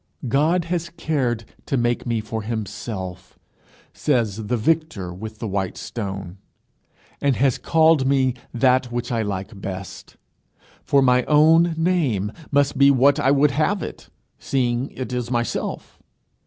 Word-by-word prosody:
"God 155 +8 +2
has 170 0 -2
cared 130 -9 -2 0.2
to 135 - 0
make 120 0 0
me 115 -2 0
for 110 +1 -4
himself," 105 -4 -6 0.6
says 110 -3 0
the 125 - 0
victor 135 - -1
with 110 +4 -8
the 110 - -5
white 95 -2 -2
stone, 95 -4 -6 0.8
"and 140 -2 +2
has 135 -1 +1
called 160 -4 +3
me 135 -2 +2 0.2
that 125 0 +2
which 120 0 -3
I 115 -2 0
like 100 -1 -5
best; 95 -1 -7 0.7
for 140 -1 +3
my 125 -1 +4
own 160 +3 +5
name 150 - +1 0.2
must 145 -1 +1
be 140 0 +7
what 140 +2 +4
I 135 - +2
would 140 +1 +4
have 160 +7 0
it, - - -8 0.3
seeing 125 0 -1
it 130 -1 -6
is 125 -1 -2
myself. 120 -1 -3
125 Hz, 140 wpm, -22 LUFS, 110-145 Hz, 0.8 s, be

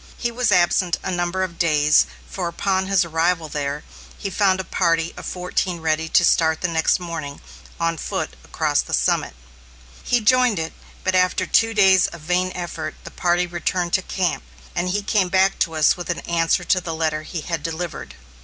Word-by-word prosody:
He 240 - -2
was 245 0 0
absent 175 0 +3
a 190 - -2
number 175 +1 -1
of 170 -3 -6
days, 150 -3 +4 0.2
for 180 -3 -4
upon 190 +2 -1
his 195 -2 +3
arrival 165 0 0
there, 145 0 -3 0.3
he 195 - -5
found 190 -1 +2
a - - -2
party 165 -2 0
of - - -8
fourteen 180 -1 -2
ready 160 0 -1
to - - +4
start 160 0 +2
next 165 -1 +2
morning, 165 -5 -6 0.4
on 165 0 0
foot, - - -3
across - - 0
the - - -2
summit. - - 0 0.7
He 245 - +1
joined 250 0 +3
it, 160 0 -3 0.3
but 185 - 0
after 185 0 +2
two 225 0 +2
days 190 -3 +5
of 170 - -10
vain 180 +3 0
effort, 175 -1 -5
the - - -9
party 175 0 +1
returned 175 0 -2
to 190 - +3
camp, 185 -3 -1 0.3
and 180 - -1
he 205 +2 -1
came 200 -3 +1
back 190 +1 +2
to 165 -2 0
us 155 -1 +4
with 175 -1 -7
an 170 - -2
answer 170 +1 +1
to 185 +2 +2
the 165 -1 -4
letter 155 -1 -1
he 160 +1 -6
had 165 -1 -3
delivered. 165 +2 -5
175 Hz, 190 wpm, -22 LUFS, 165-190 Hz, 0.7 s, days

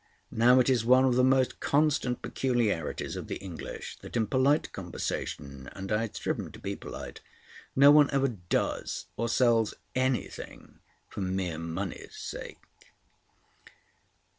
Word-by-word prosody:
Now 125 +3 +5
it 125 - +3
is 125 -4 +3
one 130 +2 +5
of 130 - +3
the 125 +1 +3
most 130 0 +3
constant 145 -4 +1
peculiarities 115 - -1
of - - -6
the - - -3
English 90 -5 -7
that - - -6
in 110 - +2
polite 130 +7 +2
conversation—and 85 -1 -5
I 105 +1 +2
had 115 -2 -4
striven - - -3
to - - -10
be - - -4
polite—no 140 +2 0
one 150 -1 +7
ever 135 -1 +2
does 90 -7 -2
or 115 - -1
sells 115 -3 +3 0.2
anything 130 0 -3 0.3
for - - -7
mere 95 -3 -2
money's 85 +3 -5
sake. - - -7
120 Hz, 135 wpm, -29 LUFS, 95-130 Hz, 0.3 s, one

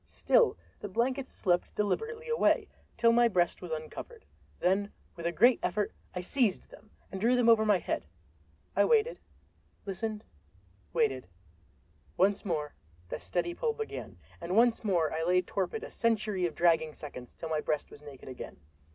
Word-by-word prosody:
Still - - +2 0.2
the 205 - -6
blankets 255 +6 -1
slipped 175 -2 0
deliberately 450 - -2
away, 470 0 +2 0.3
till 230 -1 +5
my 240 0 +5
breast 175 -6 +1
was 180 - -7
uncovered. 160 - -7 0.3
Then 195 +3 +1 0.2
with 170 0 -3
a - - 0
great 240 +9 +5
effort 210 -1 -1 0.2
I 180 - -2
seized 215 0 0
them 215 - -15 0.2
and 190 - -5
drew 240 +3 +4
them 245 -2 +3
over 225 -2 +6
my 210 -2 +5
head. - - -3 0.7
I - - +5
waited, 465 +1 +2 0.7
listened, 210 +2 -4 0.7
waited. 455 -3 0 0.9
Once 195 +2 +3
more 155 -7 -2 0.4
that - - -5
steady 170 - -2
pull 455 - -1
began, 445 0 -6 0.2
and 170 +2 -2
once 235 0 +4
more 175 -7 +1
I 160 - -1
lay 180 +2 +3
torpid 190 +4 -3
a - - -8
century 215 -5 +1
of 165 - -8
dragging 165 -3 +2
seconds 125 -5 -9
till 165 - -6
my 155 -1 0
breast 150 -1 -2
was 145 - -13
naked 145 -3 -12
again. 130 -1 -8
195 Hz, 165 wpm, -30 LUFS, 170-235 Hz, 0.9 s, over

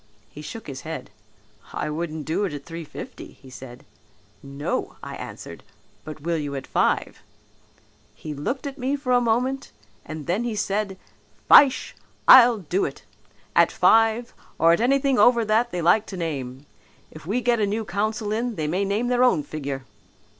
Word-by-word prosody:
He 150 - -10
shook 220 +8 -8
his 135 -2 -7
head, 160 -8 -7 0.6
'I 150 - -3
wouldn't 155 -1 -4
do 170 +6 -1
it 185 - -4
at 145 -1 -7
three 165 0 -7
fifty,' 150 - -10
he 130 - -17
said. 125 0 -11 0.6
'No,' 140 +1 -4
I - - -7
answered, - - -9 0.4
'but 155 -1 -9
will 170 +2 -1
you 145 -2 -4
at 135 - -5
five?' - - 0 0.9
He 155 - -7
looked 245 - -4
at 280 0 -6
me 260 +3 0
for 275 -3 -3
a 245 - +4
moment 250 +4 -1 0.3
and 155 -1 -8
then 190 +7 0
he 235 -2 -3
said, 205 -1 -2 0.5
'Fyshe, 270 -2 +6 0.3
I'll 245 -2 +9
do 185 0 -1
it; - - -5 0.5
at - - +5
five, 225 +1 +3 0.2
or 165 - +5
at 170 - +1
anything 270 +1 +2
over 235 +1 +5
that 220 +3 +2
they 175 -4 -4
like 205 +6 +3
to 190 - -7
name. 140 -5 -5 0.5
If 155 0 -12
we 220 +6 0
get 240 -1 +1
a 205 - +1
new 215 +2 -2
council 210 +3 -2
in 230 +2 -2
they 155 - -3
may 180 +6 0
name 205 +5 -1
their 250 0 +2
own 205 -12 +3
figure.' 140 -3 -6
200 Hz, 175 wpm, -24 LUFS, 155-235 Hz, 0.9 s, I'll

